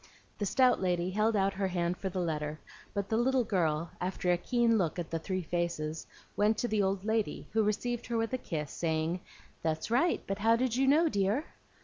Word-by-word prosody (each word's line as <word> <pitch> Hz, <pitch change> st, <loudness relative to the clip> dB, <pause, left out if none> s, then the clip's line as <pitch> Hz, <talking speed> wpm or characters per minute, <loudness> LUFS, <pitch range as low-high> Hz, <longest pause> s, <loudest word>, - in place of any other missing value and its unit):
The 205 Hz, -, 0 dB
stout 250 Hz, +1 st, +4 dB
lady 180 Hz, -1 st, 0 dB
held 215 Hz, +3 st, +2 dB
out 195 Hz, -1 st, +2 dB
her 195 Hz, 0 st, -1 dB
hand 175 Hz, -1 st, 0 dB
for 190 Hz, -, -4 dB
the 185 Hz, -, -6 dB
letter; 155 Hz, -3 st, -2 dB, 0.3 s
but 200 Hz, -1 st, -2 dB
the 220 Hz, -, 0 dB
little 255 Hz, +2 st, +3 dB
girl, 165 Hz, -6 st, 0 dB
after 180 Hz, 0 st, 0 dB
a -, -, +5 dB
keen 235 Hz, +2 st, +2 dB
look 170 Hz, -3 st, 0 dB
at 170 Hz, -2 st, -4 dB
the 165 Hz, -, -1 dB
three 185 Hz, +3 st, -3 dB
faces, 165 Hz, -2 st, -2 dB, 0.3 s
went 215 Hz, +1 st, +3 dB
to 240 Hz, -, 0 dB
the 215 Hz, -2 st, +1 dB
old 195 Hz, 0 st, 0 dB
lady, 220 Hz, -1 st, -1 dB
who 220 Hz, -, +2 dB
received 235 Hz, +3 st, -1 dB
her 235 Hz, 0 st, -1 dB
with 225 Hz, +2 st, -1 dB
a 255 Hz, -, 0 dB
kiss, 150 Hz, -, -4 dB
saying, 160 Hz, +1 st, -1 dB, 0.4 s
"That's 160 Hz, +5 st, -2 dB
right; 275 Hz, +9 st, +2 dB
but 195 Hz, +1 st, -3 dB
how 225 Hz, +2 st, +4 dB
did 245 Hz, 0 st, 0 dB
you 265 Hz, +1 st, +2 dB
know, 310 Hz, +5 st, +5 dB
dear?" 205 Hz, +3 st, +1 dB
195 Hz, 215 wpm, -31 LUFS, 170-225 Hz, 0.4 s, a